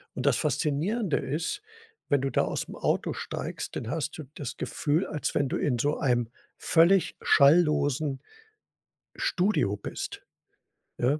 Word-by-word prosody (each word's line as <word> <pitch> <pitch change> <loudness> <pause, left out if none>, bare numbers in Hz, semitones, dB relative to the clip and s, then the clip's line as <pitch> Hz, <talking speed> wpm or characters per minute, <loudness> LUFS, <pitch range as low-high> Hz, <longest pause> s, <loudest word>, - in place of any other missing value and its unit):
Und 130 - -4
das 140 -4 +4
Faszinierende 155 - 0
ist, 165 - -2 0.5
wenn 140 -2 +2
du 135 - 0
da - - +2
aus'm - - -4
Auto - - 0
steigst, - - -5
dann 115 - -4
hast 155 0 -3
du 155 - -6
das 140 -5 -6
Gefühl, 155 +5 0
als 150 - -3
wenn 140 -2 +1
du - - -1
in 125 -4 0
so 145 +5 0
einem 120 -4 +1 0.3
völlig 170 +3 +4
schalllosen 145 -2 +4 0.9
Studio 180 - +1
bist, - - -6 0.7
ja. 140 +5 +1
145 Hz, 140 wpm, -28 LUFS, 135-160 Hz, 0.9 s, das